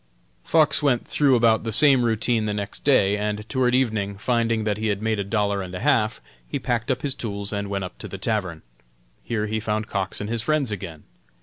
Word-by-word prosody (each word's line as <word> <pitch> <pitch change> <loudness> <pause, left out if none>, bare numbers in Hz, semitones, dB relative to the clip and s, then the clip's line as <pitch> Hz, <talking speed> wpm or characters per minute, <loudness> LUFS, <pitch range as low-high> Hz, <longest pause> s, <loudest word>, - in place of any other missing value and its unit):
Fox 155 -2 +3
went 135 -5 +1
through 140 -3 +3
about 115 -2 +3
the 115 - -3
same 135 +2 +6
routine 115 0 +1
the 105 -1 -2
next 100 -1 -5
day, 105 -8 +4
and 105 +1 -3
toward 125 -1 +1
evening, 110 -6 0
finding 115 0 0
that 105 -1 -1
he 110 +1 -2
had 100 -2 0
made 110 0 -1
a - - 0
dollar 100 -1 0
and 90 -1 -7
a - - -4
half, 110 - +1 0.3
he - - -3
packed 120 -1 -2
up 130 -1 -1
his 140 -2 -1
tools 100 -4 -4
and 100 0 -3
went 100 -1 -2
up 90 - -8
to - - -6
the 95 - -7
tavern. 95 -5 -2 0.6
Here 105 -2 -2
he 110 +1 -2
found 110 0 -2
Cox 95 -1 -2
and 105 - -4
his 115 0 -1
friends 150 -3 0
again. 90 -6 -7
110 Hz, 220 wpm, -23 LUFS, 100-120 Hz, 0.6 s, same